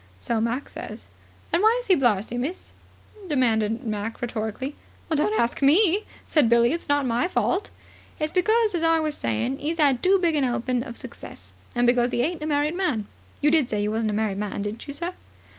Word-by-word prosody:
"So 225 - -1
Mac 235 +5 -1
says." - - -8 0.5
"And 340 - +3
why 440 +3 +5
is - - -7
he 390 - +4
blarzy, 235 - +1
miss?" 275 +10 -4 0.6
demanded 230 -5 +1
Mac 215 0 -3
rhetorically. 240 +3 -4 0.4
"Don't 220 -8 +1
ask 235 +3 0
me," 360 +8 +4 0.2
said 295 -8 +3
Billie. 235 +2 +4
"It's 335 - -5
not 285 -1 +2
my 245 +6 +1
fault." 370 +1 0 0.5
"It's 305 0 -1
because, 435 +3 +2
as 345 - -1
I 330 0 +3
was 310 -1 -1
saying, 115 +3 -1
'e's 325 +3 -3
'ad 275 -5 +3
too 385 +2 +5
big 340 -4 +1
a - - +2
'elping 250 -1 0
of 235 - -7
success, - - -8 0.2
and 240 0 +2
because 245 0 +3
'e 240 - +2
ain't 325 +2 -2
a 305 - -3
married 295 +1 +1
man. 345 - -1 0.4
You 295 - +4
did 305 -6 +3
say 210 -1 -1
you 210 - 0
wasn't 220 0 0
a - - -1
married 210 -2 -1
man, 205 -1 -3
didn't 210 +6 -5
you, 280 - -5
sir?" 345 +4 -3
260 Hz, 205 wpm, -25 LUFS, 225-325 Hz, 0.6 s, why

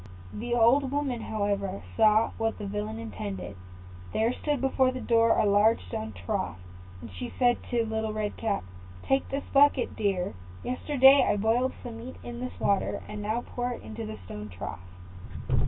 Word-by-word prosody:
The 240 +2 -2
old 250 +4 +4
woman, 275 -4 -1
however, 200 -3 -2
saw 220 0 +4
what 225 0 0
the - - -6
villain 105 +2 -3
intended. 100 -4 -6 0.6
There 225 +3 +2
stood 295 0 -1
before 265 0 +3
the 255 - -5
door 230 -2 +3
a - - +3
large 205 +2 +4
stone 110 +4 -4
trough, 90 -1 -3 0.4
and 115 - -9
she 90 - -6
said 245 -1 +4
to 235 -2 +1
Little 220 0 -2
Red 215 -1 -2
Cap, 215 -3 -1 0.4
"Take 270 0 +1
this 275 +1 -2
bucket, 280 -2 +4
dear: 195 -4 0 0.3
yesterday 270 +1 +5
I - - +2
boiled 230 +5 +2
some 230 -2 -7
meat 250 +3 -8
in 240 0 -7
this 255 0 -6
water, 200 -1 +1
now 215 +3 -1
pour 245 0 -3
it - - -9
into 110 -1 -6
the 110 0 -6
stone 105 +3 -7
trough." 90 0 -7
225 Hz, 170 wpm, -28 LUFS, 195-250 Hz, 0.6 s, yesterday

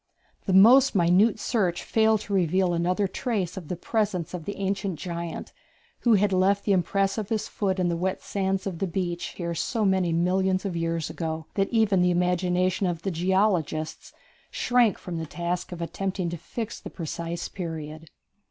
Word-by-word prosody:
The 190 - +1
most 240 +7 +7
minute 190 +5 +4
search 190 -9 0
failed 220 -1 +2
to 205 - -6
reveal 185 0 +2
another 180 +4 +1
trace 200 -5 -2
of 180 -5 -7
the 180 - -3
presence 190 -3 -1
of 170 -3 -5
the 205 - -4
ancient 195 -2 -2
giant, 170 -1 -5 0.5
who 235 -3 +4
had 200 0 +2
left 195 +2 +3
the 205 - +2
impress 195 +2 +1
of 210 -1 -5
his 220 -2 -1
foot 195 -2 -1
in 180 -1 +1
the 170 - 0
wet 185 +3 -2
sands 195 -1 -1
of 185 -4 -4
the 195 - 0
beach 175 -1 -3
here 170 -2 -3
so 220 +5 -1
many 190 -3 +2
millions 185 +3 +1
of 190 -3 -2
years 165 -1 -2
ago 160 -1 -4
that 195 -1 0
even 215 -5 +3
the 180 - +4
imagination 180 +1 +1
of 170 -2 -3
the 195 - -1
geologists 175 -3 0 0.4
shrank 245 -4 +2
from 175 -2 -6
the 160 - -5
task 175 +3 -3
of 170 -1 -5
attempting 185 0 -3
to - - -3
fix 225 +7 -6
the - - -8
precise 170 0 -5
period. 160 -3 -6
185 Hz, 180 wpm, -26 LUFS, 170-200 Hz, 0.5 s, most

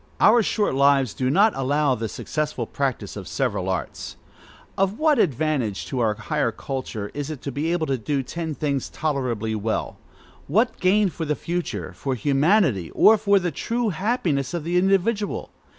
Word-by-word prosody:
Our 230 +2 +6
short 210 -3 0
lives 135 -3 +3
do 130 -1 -1
not 205 +9 +4
allow 140 +1 +1
the 115 -2 -3
successful 150 +3 -3
practice 130 -6 -3
of 100 -3 -7
several 105 -9 -1
arts. 95 - -4 0.6
Of 195 +2 0
what 310 -2 +3
advantage 140 - 0
to 130 - -4
our 110 -3 +1
higher 110 +2 -1
culture 115 -4 -5
is 145 0 -4
it 155 -4 -5
to 140 - -3
be 150 +5 -1
able 175 -2 0
to 135 -3 -1
do 135 +4 -1
ten 160 +3 -4
things 140 -3 -2
tolerably 125 -8 -2
well; 110 +1 -2 0.5
what 220 - +1
gain 195 +2 +3
for 165 -1 -5
the 150 0 0
future, 175 +3 -4
for 135 -2 -3
humanity, 140 - +2
or 220 - +7
for 205 -1 +3
the 175 -3 0
true 235 - -1
happiness 175 - -1
of 170 - -3
the 170 +2 -2
individual? 195 +3 +1
145 Hz, 170 wpm, -23 LUFS, 130-185 Hz, 0.6 s, or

